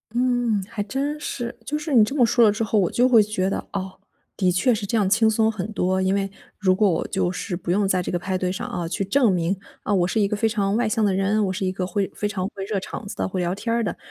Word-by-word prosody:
嗯， 245 -4 +1
还 210 - -4
真 275 +7 -3
是。 240 -5 -4
就 300 +4 -2
是 305 -1 -4
你 230 -4 +7
这 240 +7 -2
么 255 -5 +5
说 235 +1 +3
了 210 - +5
之 220 +2 -2
后， 215 0 +1
我 180 - +2
就 250 +1 +3
会 235 -3 +7
觉 205 -3 -1
得， - - -4
哦， 190 -1 -5 0.4
的 185 -2 +2
确 210 +8 +2
是 210 -2 -3
这 215 - -2
样 200 -3 +2
轻 220 +2 +4
松 220 0 +2
很 210 -2 -5
多。 190 -1 +1
因 190 +1 +1
为 195 0 -1 0.3
如 185 -2 +3
果 205 +2 +3
我 165 - 0
就 190 -2 0
是 180 0 -4
不 175 - -3
用 200 +3 +2
在 185 -1 +1
这 - - -4
个 175 - 0
派 185 +1 -2
对 185 0 -1
上 210 +6 -4
啊， 175 -9 -3
去 175 +3 -2
证 240 +5 +3
明， 180 +1 0 0.3
啊， 210 - 0
我 180 -3 +2
是 220 +3 0
一 200 - +3
个 210 - -2
非 225 - +2
常 205 -2 0
外 240 -1 +1
向 215 +1 0
的 200 -2 +2
人， 195 +3 +1
我 - - -1
是 190 +1 -2
一 185 - 0
个 185 -1 -2
会 190 +2 -1
非 - - -3
常 190 -3 -3
会 195 -1 -7
热 205 -1 -1
场 195 - -7
子 200 - -7
的、 - - -1
会 185 -1 -3
聊 175 0 0
天 215 +4 -3
儿 235 - +1
的， - - -3
205 Hz, 320 characters per minute, -23 LUFS, 185-225 Hz, 0.4 s, 你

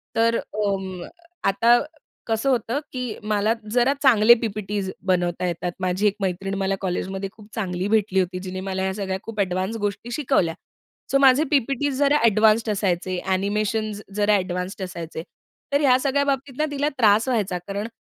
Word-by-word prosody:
तर 230 +1 +3
अं, 195 -3 -3 0.4
आता 230 +5 +4 0.5
कसं 225 +4 0
होतं, 245 +1 0
की 250 -4 -4
मला 210 +1 +1 0.2
जरा 245 +3 +3
चांगले 235 -4 +7
पी-पी-टीस 205 -3 -3 0.2
बनवता 180 -1 +1
येतात. 175 +1 -2
माझी 185 +2 +1
एक 205 - +1
मैत्रीण 195 +1 -2
मला 195 0 0
कॉलेजमध्ये 190 +1 -3
खूप 210 0 -16
चांगली 185 -3 -2
भेटली 205 -3 +2
होती, 180 0 -1
जिने 185 0 -6
मला 190 0 -3
ह्या 190 0 -1
सगळ्या 190 -1 -3
खूप 225 -2 -7
अ‍ॅडवान्स 190 +2 -1
गोष्टी 205 +4 -4
शिकवल्या. 240 - +1 0.6
सो, 275 - +5
माझे 275 +1 +5
पी-पी-टीस 275 0 +1
जरा 285 +1 +4
अ‍ॅडवान्स्ड 220 -1 +4
असायचे, 185 -2 -1
अ‍ॅनिमेशन्स 205 +2 -1
जरा 210 0 +3
अ‍ॅडवान्स्ड 180 +1 -3
असायचे. 170 -3 -6 0.5
तर 285 - +3
ह्या 255 -3 +5
सगळ्या 280 +1 +1
बाबतीत 270 -1 -2
ना, 305 - +2
तिला 290 +1 0
त्रास 220 0 +4
व्हायचा 210 -7 0
कारण 200 +2 -3
205 Hz, 160 wpm, -23 LUFS, 190-235 Hz, 0.6 s, चांगले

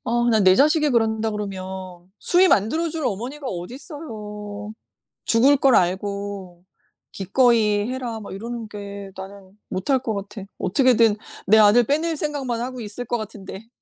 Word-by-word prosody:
아 240 0 +1
난 220 -3 +3
내 185 0 +7
자식이 300 - +3
그런다 225 -2 +1
그러면 190 -3 -7
수의 365 +2 +4
만들어 315 - +2
줄 315 -1 -4
어머니가 250 +7 -4
어디 180 +4 -6
있어요. 210 - -8 0.5
죽을 265 +5 +4
걸 270 -2 +4
알고 190 -1 -2 0.5
"기꺼이 210 0 +2
해라." 245 -4 -4
막 200 - -8
이러는 230 +2 -6
게 200 -1 -8
나는 195 +1 -11
못할 230 +9 +1
것 230 -4 -3
같아. 200 0 -6 0.2
어떻게든 225 +2 +3 0.3
내 215 +3 +6
아들 215 +3 +6
빼낼 315 +6 0
생각만 275 -6 -2
하고 250 +1 -5
있을 220 +3 -6
것 240 - -1
같은데. 215 -1 -8
220 Hz, 300 characters per minute, -22 LUFS, 200-250 Hz, 0.5 s, 내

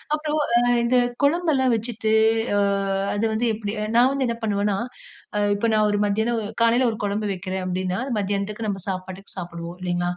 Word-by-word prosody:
அப்புறம் 305 0 -2 0.2
அ - - +6 0.2
இந்த 250 +2 +3 0.3
குழம்பு 335 +3 +3
எல்லாம் 260 -3 +2
வச்சிட்டு 225 -1 -2 0.5
ஆ - - +3 0.5
அது 205 +2 0
வந்து 235 +2 0
எப்டி. 210 -1 -4 0.2
நான் 245 +2 +6
வந்து 275 -1 0
என்ன 235 0 -2
பண்ணுவேன்னா 205 -2 0 0.8
இப்போ 205 +3 0
நான் 215 0 +3
ஒரு 205 - +1
மத்தியானம், 220 +3 0 0.2
காலையில 240 +2 +4
ஒரு 220 - -6
குழம்பு 205 +1 -1
வைக்கிறன் 185 0 -4
அப்டின்னா, 185 +1 -2 0.2
மதியானத்துக்கு 205 +2 -2
நம்ம 195 -2 -3
சாப்பாட்டுக்கு 185 +1 -6
சாப்டுவோம் 170 -1 -6
இல்லைங்களா? 175 -1 -1
210 Hz, 165 wpm, -23 LUFS, 190-235 Hz, 0.8 s, அ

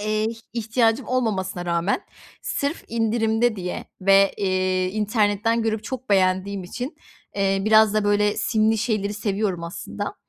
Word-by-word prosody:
eee, 215 +1 0 0.3
ihtiyacım 230 +2 +1
olmamasına 190 -8 -1
rağmen 170 +3 0 0.4
sırf 285 +3 -2
indirimde 225 0 +1
diye 180 -1 -4 0.2
ve, 195 0 +5
eee, 185 -1 0
internetten 210 +2 +1
görüp 220 -1 -1
çok 255 -2 -6
beğendiğim 190 0 +2
için, 250 - -6 0.4
eee, 195 0 +1
biraz 215 -1 +5
da 215 -1 +1
böyle 205 0 +2
simli 220 -1 +2
şeyleri 210 -2 -1
seviyorum 200 -4 -2
aslında. 170 +2 -6
210 Hz, 130 wpm, -23 LUFS, 195-225 Hz, 0.4 s, ve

